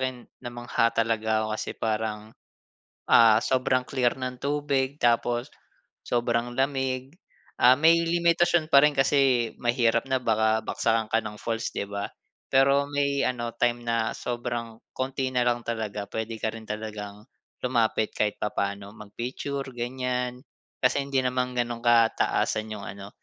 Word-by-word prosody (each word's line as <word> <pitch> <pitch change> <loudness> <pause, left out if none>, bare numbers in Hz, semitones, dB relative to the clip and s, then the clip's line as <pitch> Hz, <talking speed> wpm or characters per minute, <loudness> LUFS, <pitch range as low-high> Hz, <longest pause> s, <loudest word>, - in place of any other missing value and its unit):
akin, 130 -2 -3 0.2
namangha 120 -1 0
talaga 110 -1 +1
ako - - -2
kasi 110 - -3
parang, 110 0 -3 0.8
ah, 110 -1 +7
sobrang 130 0 +1
clear 125 -3 +1
ng 130 -1 -5
tubig 140 0 -1
tapos 120 +2 +1 0.6
sobrang 120 0 0
lamig, 135 +2 -2 0.4
ah, 125 - +7
may 160 +5 +5
limitasyon 170 -1 +2
pa 140 -1 +7
rin 150 - +2
kasi 135 -4 +3
mahirap 120 -1 +1
na 130 -1 0
baka 110 -1 +2
bagsakan 110 0 0
ka 110 - +2
ng 105 -1 -7
falls, 115 0 -3
'di 100 - -4
ba? 100 0 -3 0.5
Pero 140 +1 +4
may 140 -1 +1
ano 120 -2 -2
time 120 0 +1
na 115 -1 0
sobrang 120 -2 -4 0.2
kaunti 130 0 -2
na 125 - +2
lang 120 -1 0
talaga, 110 -3 -3
pwede 110 0 -3
ka 110 0 -2
rin 110 -1 -10
talagang 105 -1 -6 0.4
lumapit 115 -3 +1
kahit 105 -1 0
papaano, 100 -1 -3
mag-picture 125 +6 -5
ganyan, 125 +1 -3 0.4
kasi 125 +2 +3
hindi 140 -1 0
naman 125 0 -1
ganun 120 -1 -1
kataasan 115 -2 +2
yung 105 -2 -7
ano, 100 -1 -8
120 Hz, 140 wpm, -26 LUFS, 110-130 Hz, 0.8 s, ah